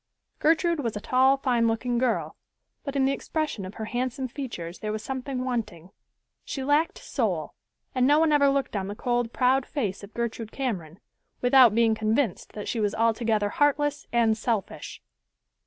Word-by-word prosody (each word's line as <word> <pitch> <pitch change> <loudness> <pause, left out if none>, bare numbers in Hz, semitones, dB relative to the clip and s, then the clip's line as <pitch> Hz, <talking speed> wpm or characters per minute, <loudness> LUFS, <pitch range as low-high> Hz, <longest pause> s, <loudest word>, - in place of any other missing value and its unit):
Gertrude 330 +1 +2
was 230 -6 -2
a - - -3
tall, 260 +5 +3
fine 245 -4 +1
looking 235 +2 0
girl, 255 -2 0 0.5
but 280 -2 -5
in 270 -1 +3
the 270 - +2
expression 300 -7 -3
of 190 - -10
her 220 - -5
handsome 255 +3 -2
features 230 - -6
there 215 - -3
was 215 0 -4
something 260 0 -4
wanting. 205 -8 -4 0.5
She 270 - -5
lacked 295 +4 +2
soul, - - -2 0.4
and 255 -1 +3
no 295 +1 +5
one 320 0 +3
ever 285 -1 +5
looked 275 -4 -1
on 190 -2 -2
the 205 - -5
cold, 240 0 -1
proud 255 +2 +2
face 210 -9 -3
of 200 - -12
Gertrude 230 -1 -3
Cameron, 190 - -4 0.4
without 245 -3 +6
being 230 -1 +4
convinced 220 0 -1
that 210 - -6
she 235 - -2
was 210 -1 0
altogether 225 -2 +1
heartless 290 +2 +1
and 230 -2 +3
selfish. 220 -2 -3
240 Hz, 170 wpm, -26 LUFS, 220-275 Hz, 0.5 s, without